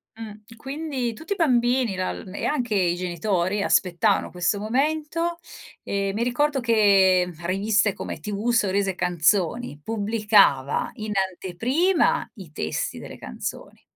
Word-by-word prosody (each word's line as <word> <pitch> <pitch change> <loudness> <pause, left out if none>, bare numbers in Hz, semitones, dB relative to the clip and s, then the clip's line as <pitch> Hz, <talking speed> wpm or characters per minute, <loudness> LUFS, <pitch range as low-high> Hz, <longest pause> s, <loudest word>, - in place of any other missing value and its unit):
Mh, 220 0 -11
quindi 270 -2 -4
tutti 320 - -4
i - - -7
bambini 245 - +2
lal 185 +1 -4
e - - -4
anche 245 -7 -1
i 175 -3 +2
genitori 185 +2 -1
aspettavano 180 -4 +2
questo 180 +3 0
momento, 310 +9 -1 0.5
ehm, 195 -1 -2
mi 220 +3 -1
ricordo 270 +4 +1
che 195 -6 +4
riviste 200 +3 +2
come 160 - -6
TV, 205 +7 -3
sorrisi 200 -3 +1
e 190 - -3
canzoni 180 +2 0
pubblicava 210 -9 +2
in 215 0 -5
anteprima 210 - 0
i 185 -7 -11
testi 80 - -3
delle - - -10
canzoni 65 - -7
210 Hz, 130 wpm, -24 LUFS, 185-245 Hz, 0.5 s, che